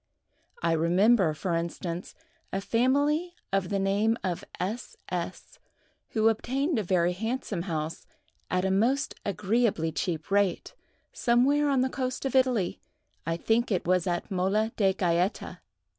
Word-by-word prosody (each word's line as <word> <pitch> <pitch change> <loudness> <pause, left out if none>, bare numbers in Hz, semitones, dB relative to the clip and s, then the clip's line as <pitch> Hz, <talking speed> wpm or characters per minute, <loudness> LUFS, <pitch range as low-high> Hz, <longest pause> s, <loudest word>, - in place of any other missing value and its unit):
I 165 - +2
remember, 180 +4 +4
for 175 +3 -2
instance, 170 +1 -3 0.4
a 195 - -1
family 285 - +1 0.2
of 195 -2 +1
the 200 - 0
name 200 +4 +2
of 180 -3 -2 0.2
S—— 210 +7 -4
S——, - - -5 0.5
who 220 0 +2
obtained 265 +6 +1
a - - -1
very 180 -1 +2
handsome 220 -1 -3
house 160 -2 -4 0.4
at 180 +1 +1
a 190 - +1
most 240 +9 +1
agreeably 205 -4 +1
cheap 160 +1 -3
rate, 200 -3 +1 0.4
somewhere 275 +5 +3
on 270 -2 +3
the 260 - +2
coast 255 0 -3
of 270 - -1
Italy—I 230 -8 -1
think 225 +6 +1
it 185 - 0
was 180 0 +2
at 175 +2 -2
Mola 195 +4 +1
de 195 -3 +3
Gaeta. 180 +1 0
200 Hz, 140 wpm, -28 LUFS, 180-240 Hz, 0.5 s, remember